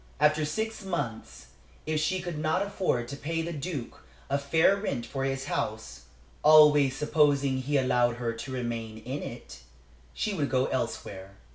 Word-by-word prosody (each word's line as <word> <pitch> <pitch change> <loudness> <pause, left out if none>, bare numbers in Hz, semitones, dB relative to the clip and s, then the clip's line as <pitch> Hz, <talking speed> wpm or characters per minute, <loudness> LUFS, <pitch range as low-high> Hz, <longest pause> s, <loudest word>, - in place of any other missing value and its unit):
After 150 +1 +3
six 220 +8 -3
months, 125 -12 -4 0.4
if 155 0 0
she 180 +4 0
could 175 -4 -5
not 160 +5 +1
afford 185 -12 -1
to 140 - -5
pay 165 +3 -3
the 170 +1 -4
Duke 145 - -5 0.3
a 140 - +2
fair 160 +7 +3
rent 140 - -3
for 135 +3 -3
his 135 0 -2
house - - -4 0.4
always 150 -3 +6
supposing 145 -3 +2
he 140 +3 0
allowed 125 -2 +2
her 120 -1 -2
to 115 +3 -7
remain 115 -3 -4
in 125 +6 -5
it - - -8 0.6
she 210 - -1
would 150 -7 -1
go 130 0 +2
elsewhere. 100 -7 -4
140 Hz, 160 wpm, -28 LUFS, 125-155 Hz, 0.6 s, always